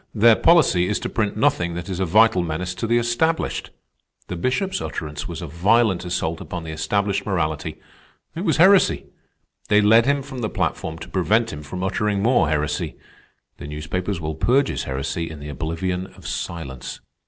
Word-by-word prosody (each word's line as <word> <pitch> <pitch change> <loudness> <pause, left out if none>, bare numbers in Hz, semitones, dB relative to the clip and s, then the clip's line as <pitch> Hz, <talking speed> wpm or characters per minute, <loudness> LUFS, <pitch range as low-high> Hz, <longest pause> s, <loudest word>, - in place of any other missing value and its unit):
Their 115 +1 +6
policy 155 - +4
is 105 - 0
to - - -3
print 105 -2 -1
nothing 85 -5 +1
that 85 +1 -5
is 95 -2 -4
a 95 - 0
vital 110 +1 +5
menace 85 +2 -3
to 115 - -3
the 120 +1 +3
established. 120 +8 0 0.6
The 90 - -3
Bishop's 155 - -1
utterance 75 -1 -5
was 85 0 -6
a - - -5
violent 95 +4 +2
assault 85 -2 -2
upon 90 -2 -6
the 80 - -6
established 100 +5 0
morality. 80 -7 -2 0.6
It 170 - -4
was 160 -6 +1
heresy. 190 +4 +5 0.6
They 105 - +5
led 110 +3 +5
him 140 -1 +2
from 135 -2 -8
the 110 -3 -2
platform 80 0 -2
to - - -9
prevent 110 +5 +1
him 75 - -7
from 90 +5 -6
uttering 100 +1 0
more 120 -9 +3
heresy. 75 -1 -1 0.6
The - - -8
newspapers 80 +6 -3
will 80 -1 -3
purge 130 - +2
his - - -3
heresy 70 +5 -3
in 80 -2 -9
the 75 +1 -8
oblivion 85 +5 -3
of - - -17
silence. 70 -7 -5
95 Hz, 180 wpm, -22 LUFS, 80-115 Hz, 0.6 s, Their